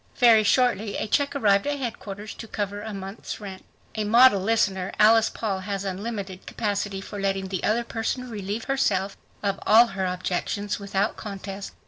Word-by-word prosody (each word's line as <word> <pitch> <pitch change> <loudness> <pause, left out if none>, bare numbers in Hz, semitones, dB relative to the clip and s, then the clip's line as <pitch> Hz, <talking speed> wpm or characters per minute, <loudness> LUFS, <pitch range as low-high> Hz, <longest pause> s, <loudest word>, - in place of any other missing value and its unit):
Very 230 -3 +6
shortly 220 -2 +2
a - - -2
check 280 +6 +1
arrived 200 -4 +3
at 290 0 0
headquarters 215 -5 -6
to 225 - -9
cover 205 -1 -3
a 220 - -6
month's 195 +1 -7
rent. 195 -3 -8 0.3
A 215 - -2
model 230 -1 +6
listener, 195 -3 +1
Alice 225 +1 +6
Paul 200 -4 -3
has 200 0 -4
unlimited 195 -1 -5
capacity 205 -2 -2
for 205 +1 -7
letting 195 -1 -1
the 185 -2 -3
other 230 +3 +2
person 235 +2 -3
relieve 210 -1 -4
herself 200 -8 0 0.3
of 200 -1 -1
all 225 +3 +8
her 190 -1 -1
objections 185 +3 -2
without 200 +1 -1
contest. 200 -1 -7
205 Hz, 165 wpm, -25 LUFS, 195-225 Hz, 0.3 s, all